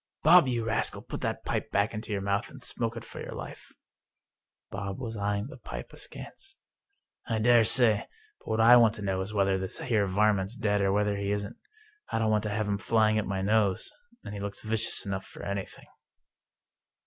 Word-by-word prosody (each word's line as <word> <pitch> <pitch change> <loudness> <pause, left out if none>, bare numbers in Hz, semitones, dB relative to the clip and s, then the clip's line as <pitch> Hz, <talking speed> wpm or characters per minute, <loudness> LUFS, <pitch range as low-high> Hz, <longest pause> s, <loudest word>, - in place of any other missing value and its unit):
" - - -56
Bob, 170 -1 +7
you 120 -3 -1
rascal, 115 - -1
put - - -7
that - - -3
pipe - - -2
back 100 +3 +1
into 110 0 -6
your 100 -1 -1
mouth, 100 +2 -1
and 135 -2 -11
smoke 115 0 -2
it 115 - -7
for - - -9
your - - -7
life! - - -9 0.5
" - - -62
Bob 100 0 -5
was 115 -3 -5
eying 100 0 -1
the 145 - -10
pipe - - -8
askance. 390 0 -8 0.3
" - - -46 0.3
I 115 - -1
dare 120 +1 +5
say, 110 -2 +6 0.3
but - - -24
what 110 - -1
I 120 +2 +8
want 115 -2 +4
to 105 - -8
know 95 -1 -1
is 95 +2 -5
whether 95 -2 +1
this 95 0 -4
here 110 -5 +1
varmint's 100 +1 +1
dead 105 -3 0
or 95 -1 +2
whether 105 0 +1
he 100 0 -2
isn't. 100 0 -3 0.5
I - - 0
don't 110 -1 +1
want 105 0 +2
to - - -1
have 105 0 -2
him 100 -1 -1
flying 110 0 +2
at 110 - -3
my 95 -1 -2
nose 105 - +1 0.2
— 235 +1 -31
^and 100 - -6
he 100 - -6
looks 100 0 -6
vicious 110 0 0
enough 95 -1 -4
for - - -11
anything." 100 -1 -5
105 Hz, 220 wpm, -28 LUFS, 100-115 Hz, 0.5 s, I